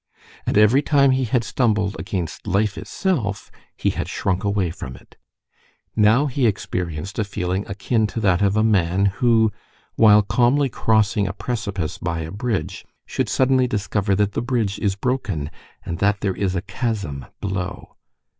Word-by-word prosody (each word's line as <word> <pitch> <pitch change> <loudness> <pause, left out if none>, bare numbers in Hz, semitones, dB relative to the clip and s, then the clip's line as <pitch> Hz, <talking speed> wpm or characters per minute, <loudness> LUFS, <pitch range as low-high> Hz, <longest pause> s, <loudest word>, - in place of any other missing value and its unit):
And - - +1
every 105 +6 +5
time 140 -2 +4
he 130 0 +1
had 120 +1 +1
stumbled 105 -5 0
against 90 -3 -4
life 100 +1 +1
itself 130 - -2 0.3
he - - +1
had - - -4
shrunk 95 +1 -1
away 100 -4 0
from 65 -5 -8
it. - - -18 0.8
Now 110 +6 +4
he 135 -3 +1
experienced 90 -2 -3
a - - +2
feeling 95 -1 -2
akin 105 +3 0
to 115 - -5
that 95 -4 +2
of 100 +1 +2
a 110 - +3
man 95 -3 +2 0.2
who, 115 -3 +4 0.5
while 105 -2 +7
calmly 125 +8 +2
crossing 105 -3 +2
a 100 - -3
precipice 100 -8 -3
by 85 -1 -2
a 80 0 -6
bridge, 105 - -3 0.2
should - - -2
suddenly 130 -1 +3
discover 100 -2 0
that 105 +1 +1
the - - -2
bridge 120 -5 -1
is 100 -3 0
broken, 100 - -2 0.3
and 85 0 -4
that 100 +1 +1
there 100 -2 0
is 95 -2 -1
a 90 - -2
chasm 100 - -3
below. 95 -1 -4
105 Hz, 165 wpm, -22 LUFS, 95-115 Hz, 0.8 s, while